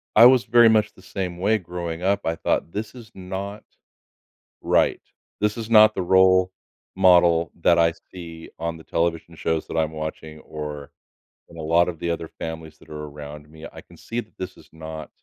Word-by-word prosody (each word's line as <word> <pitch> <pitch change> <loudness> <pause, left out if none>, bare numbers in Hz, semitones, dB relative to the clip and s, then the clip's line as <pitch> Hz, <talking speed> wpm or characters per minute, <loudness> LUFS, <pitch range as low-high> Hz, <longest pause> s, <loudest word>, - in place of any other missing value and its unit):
I 115 +2 +9
was 125 -1 +7
very 120 0 +6
much 105 -1 +3
the 95 - -19
same 90 -2 -5
way 105 +4 +2
growing 85 -2 -6
up. 100 +1 +1
I 80 0 0
thought 85 - -1
this 110 +4 -5
is 115 -3 -12
not 95 +2 -6 1.0
right, - - +2 0.4
this 105 +1 0
is 115 0 -6
not 110 -1 +7
the 95 - -2
role 95 0 +4 0.4
model 85 -2 +4
that 85 -1 +4
I 85 0 +4 0.2
see 85 -3 -10
on 85 0 -3
the 80 - -14
television 85 0 -2
shows 80 -1 -2
that - - -5
I'm 80 0 0
watching 80 0 -7
or 75 -2 -7 0.6
in 85 - -15
a 80 - -6
lot 85 +3 +3
of 85 -3 -5
the 85 - -2
other 85 -1 -3
families 80 -1 -7
that - - -20
are 75 0 -6
around 75 0 -10
me. 80 0 -13
I - - -10
can - - -19
see 115 - -6
that 110 - -17
this 95 0 -6
is - - -18
not 80 -1 -8
85 Hz, 195 wpm, -23 LUFS, 80-95 Hz, 1.0 s, I